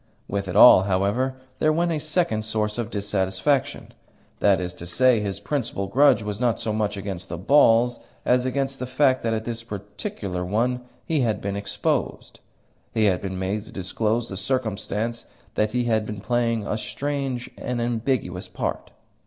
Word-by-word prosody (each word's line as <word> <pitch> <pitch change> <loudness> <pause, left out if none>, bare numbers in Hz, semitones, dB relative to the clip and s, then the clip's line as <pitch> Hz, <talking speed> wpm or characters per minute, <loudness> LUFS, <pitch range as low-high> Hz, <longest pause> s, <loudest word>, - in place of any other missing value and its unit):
With 100 -1 -2
it 90 - -4
all, 105 -2 +9
however, 100 +8 +1 0.2
there 155 - +3
went 170 +2 +1
a 155 - 0
second 155 -8 0
source 110 0 -1
of 115 -2 -2
dissatisfaction. 100 +5 -1 0.5
That 100 -3 +4
is 90 -1 -3
to 85 - -8
say, 125 +6 +4
his 100 -2 -3
principal 120 -5 -2
grudge 125 +1 +4
was 105 0 -4
not 120 -2 +1
so 110 - -2
much 105 -1 -1
against 95 -2 -5 0.2
balls 120 -4 +5 0.3
as 125 0 +3
against 135 +1 -1
the 125 - -3
fact 130 0 +3
that 115 -1 0
at 110 0 -4
this 115 -1 -4
particular 100 - -5
one 120 +7 0 0.2
he 160 -2 0
had 110 -5 +1
been 100 0 -3
exposed, 100 -1 -2 0.6
he 110 - +3
had 95 -3 +2
been 95 -1 -4
made 95 +3 -2
to - - -13
disclose 110 +5 -1
the 95 - -6
circumstance 115 0 -2 0.3
that 105 - +1
he 125 +2 0
had 110 -2 +1
been 105 -1 -5
playing 115 0 0
a 105 - -2
strange, 130 +3 -3
an 125 -1 -3
ambiguous 115 -6 -1
part. - - -4
110 Hz, 170 wpm, -24 LUFS, 100-125 Hz, 0.6 s, all